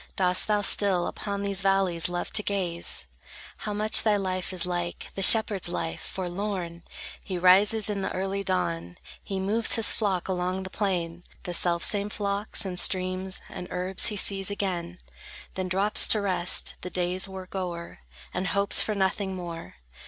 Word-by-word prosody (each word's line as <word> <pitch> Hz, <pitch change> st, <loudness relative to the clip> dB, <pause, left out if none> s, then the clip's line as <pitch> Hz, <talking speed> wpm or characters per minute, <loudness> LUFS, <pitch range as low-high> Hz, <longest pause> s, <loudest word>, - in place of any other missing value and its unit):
Dost 180 Hz, -1 st, +2 dB
thou 210 Hz, -1 st, +1 dB
still 190 Hz, -4 st, +3 dB
Upon 200 Hz, -1 st, -5 dB
these 200 Hz, -1 st, 0 dB
valleys 195 Hz, -4 st, +1 dB
love 175 Hz, 0 st, -5 dB
to 210 Hz, -, +7 dB
gaze? 175 Hz, -, -3 dB, 0.5 s
How 210 Hz, -, -6 dB
much 210 Hz, +1 st, +3 dB
thy 215 Hz, -2 st, +2 dB
life 185 Hz, -2 st, -3 dB
is 180 Hz, -2 st, -2 dB
like 175 Hz, -1 st, -5 dB
The 195 Hz, -, -5 dB
shepherd's 205 Hz, -3 st, +7 dB
life, 165 Hz, -1 st, -4 dB
forlorn! 180 Hz, -2 st, -5 dB, 0.4 s
He 185 Hz, -3 st, -5 dB
rises 195 Hz, +4 st, +4 dB
in 205 Hz, -2 st, -3 dB
the -, -, -3 dB
early 195 Hz, +1 st, -3 dB
dawn, 85 Hz, -, -3 dB, 0.3 s
He 195 Hz, -1 st, -5 dB
moves 215 Hz, +4 st, +1 dB
his 225 Hz, -, +5 dB
flock 195 Hz, -5 st, -2 dB
along 185 Hz, 0 st, -3 dB
the 190 Hz, -, -9 dB
plain; 175 Hz, -4 st, -3 dB, 0.2 s
The 175 Hz, -, -5 dB
selfsame 180 Hz, +4 st, +1 dB
flocks, 205 Hz, 0 st, -2 dB
and 180 Hz, -2 st, -1 dB
streams, 185 Hz, +1 st, -1 dB
and 180 Hz, -, -8 dB
herbs 185 Hz, +3 st, +1 dB
He 215 Hz, -, -2 dB
sees 195 Hz, 0 st, +1 dB
again; 180 Hz, -3 st, -4 dB, 0.6 s
Then 185 Hz, -1 st, -4 dB
drops 195 Hz, +3 st, +5 dB
to 215 Hz, -, +3 dB
rest, 185 Hz, -3 st, -1 dB
the 180 Hz, -, -6 dB
day's 180 Hz, +1 st, -2 dB
work 190 Hz, -1 st, -10 dB
o'er; 175 Hz, -, -6 dB, 0.3 s
And 185 Hz, +2 st, -3 dB
hopes 200 Hz, 0 st, +5 dB
for 215 Hz, -, -2 dB
nothing 190 Hz, 0 st, -1 dB
more. 170 Hz, -, -8 dB
190 Hz, 165 wpm, -26 LUFS, 180-200 Hz, 0.6 s, to